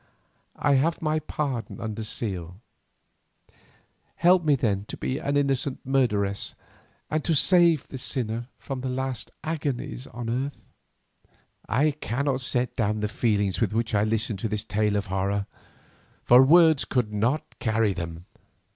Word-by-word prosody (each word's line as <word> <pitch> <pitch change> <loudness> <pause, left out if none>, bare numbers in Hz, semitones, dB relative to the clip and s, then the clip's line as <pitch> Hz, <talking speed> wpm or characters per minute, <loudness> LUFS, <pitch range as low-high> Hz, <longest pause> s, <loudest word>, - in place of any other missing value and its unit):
I 145 - +2
have 165 +3 0
my 155 0 0
pardon 135 -7 -4
under 110 0 -4
seal. 95 -5 -4 1.6
Help 175 +1 +4
me 150 -2 +4
then 100 -6 0
to - - -8
be 130 - -2
an 140 0 0
innocent 140 -1 0
murderess, 105 -7 0 0.6
and 155 -1 0
to 165 - +1
save 170 -1 +4
this 130 - -7
sinner 120 -3 -1
from 135 -2 -6
her 130 - -3
last 130 -3 -3
agonies 145 -5 -3
on 120 0 -7
earth." 130 +4 -3 1.0
I 145 +6 +3
cannot 140 -1 -2
set 125 -1 -1
down 105 -1 0
the 105 - 0
feelings 105 -3 0
with 110 -2 +1
which 115 0 -1
I 105 0 +3
listened 110 -1 -1
to 110 - -2
this 105 0 -2
tale 105 -1 0
of 100 -1 0
horror, 100 +1 -1 0.8
for 125 +1 +7
words 160 0 +6
could 120 -5 -1
not 120 +9 -1
carry 110 -3 +1
them. 85 -1 -6
120 Hz, 145 wpm, -26 LUFS, 105-140 Hz, 1.6 s, for